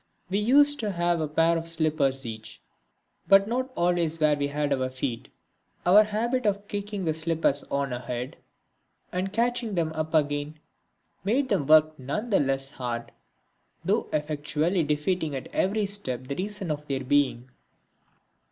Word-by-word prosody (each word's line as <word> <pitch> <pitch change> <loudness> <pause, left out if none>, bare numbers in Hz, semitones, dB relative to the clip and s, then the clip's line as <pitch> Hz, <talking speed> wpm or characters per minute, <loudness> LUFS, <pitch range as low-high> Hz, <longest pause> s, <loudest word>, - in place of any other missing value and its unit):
We 200 - +2
used 285 +6 +4
to 210 -3 -2
have 175 -1 +1
a 155 - -1
pair 165 +3 +2
of 165 - -7
slippers 155 -5 +1
each, 110 -1 -8 0.7
but 195 0 +6
not 255 +3 -1
always 170 -2 +1
where 155 -1 +4
we 140 0 -1
had 145 0 -1
our 130 -1 -1
feet. 130 -2 -4 0.6
Our 200 +4 +7
habit 230 +3 -1
of 200 0 -1
kicking 205 -2 -4
the 160 - +1
slippers 160 -3 0
on 140 -2 -2
ahead, 125 +1 -5 0.7
and 185 +2 -2
catching 235 -1 0
them 165 -2 0
up 155 0 -3
again, 145 0 0 0.7
made 255 +7 +1
them 185 - 0
work 155 0 +5
none 210 - -4
the 195 - +4
less 135 -1 0
hard, 120 -3 -5 0.7
through 205 +5 +1
effectually 155 +3 0
defeating 150 +1 -1
at 130 - -7
every 205 +2 +1
step 165 -11 -3
the 140 +2 -4
reason 195 0 -3
of 150 0 -5
their 135 -1 -2
being. 130 -2 +1
160 Hz, 155 wpm, -26 LUFS, 140-200 Hz, 0.7 s, Our